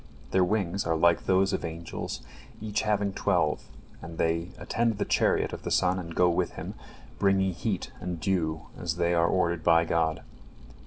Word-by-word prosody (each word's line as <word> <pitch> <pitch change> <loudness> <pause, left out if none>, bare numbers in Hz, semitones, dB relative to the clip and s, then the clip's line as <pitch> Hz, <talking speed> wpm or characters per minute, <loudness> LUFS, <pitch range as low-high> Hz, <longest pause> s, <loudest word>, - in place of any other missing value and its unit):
Their 95 - +4
wings 100 0 0
are 80 - +2
like 85 +1 +3
those 95 +1 +3
of - - -1
angels, 85 0 -5 0.4
each 105 -1 -1
having 105 -2 0
twelve, - - +1 0.4
and 80 0 -9
they 85 +1 0
attend 115 -2 0
the - - -1
chariot - - +2
of - - -6
the - - -4
sun 95 0 +2
and 85 -2 -7
go 90 - +4
with 85 - 0
him, - - -6 0.5
bringing 95 -1 +3
heat 100 +1 -3
and 90 -2 -4
dew 80 -2 0
as 85 -2 -3
they 85 0 +1
are 85 0 +3
ordered 85 -2 +1
by 85 +2 +5
God. 80 -1 0
85 Hz, 175 wpm, -28 LUFS, 85-95 Hz, 0.5 s, by